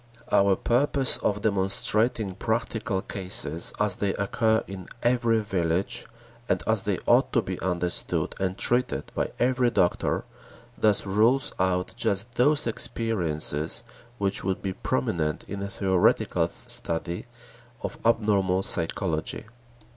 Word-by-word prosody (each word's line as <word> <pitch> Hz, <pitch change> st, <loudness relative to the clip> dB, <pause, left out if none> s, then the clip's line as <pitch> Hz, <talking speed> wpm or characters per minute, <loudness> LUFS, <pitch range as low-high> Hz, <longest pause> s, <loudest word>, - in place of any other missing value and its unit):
Our 100 Hz, -1 st, +4 dB
purpose 135 Hz, +4 st, +3 dB
of 105 Hz, 0 st, -1 dB
demonstrating 105 Hz, +1 st, +2 dB
practical 110 Hz, -2 st, -2 dB
cases 90 Hz, -5 st, 0 dB
as 105 Hz, -3 st, +1 dB
they 100 Hz, -1 st, -1 dB
occur 110 Hz, +2 st, +1 dB
in 95 Hz, -2 st, -9 dB, 0.2 s
every 120 Hz, -2 st, +2 dB
village, 90 Hz, -3 st, -1 dB, 0.4 s
and -, -, 0 dB
as -, -, +3 dB
they -, -, -1 dB
ought -, -, +3 dB
to -, -, +3 dB
be -, -, -5 dB
understood 90 Hz, -1 st, -1 dB
and 95 Hz, 0 st, -2 dB
treated 125 Hz, +1 st, +1 dB
by -, -, -1 dB
every 125 Hz, 0 st, +2 dB
doctor, 90 Hz, -7 st, 0 dB, 0.5 s
thus 105 Hz, -3 st, +2 dB
rules 110 Hz, +7 st, +2 dB
out 90 Hz, 0 st, 0 dB
just 115 Hz, 0 st, -1 dB
those 145 Hz, +4 st, +3 dB
experiences 85 Hz, -10 st, -1 dB, 0.3 s
which 100 Hz, -2 st, 0 dB
would 95 Hz, 0 st, -2 dB
be 95 Hz, -1 st, -2 dB
prominent 75 Hz, +1 st, -2 dB
in 100 Hz, 0 st, -7 dB
a 100 Hz, -, -4 dB
theoretical 95 Hz, -2 st, +1 dB
study 85 Hz, +5 st, -2 dB, 0.6 s
of -, -, -5 dB
abnormal 100 Hz, -5 st, +2 dB
psychology. 80 Hz, -2 st, -1 dB
100 Hz, 125 wpm, -26 LUFS, 90-115 Hz, 0.6 s, Our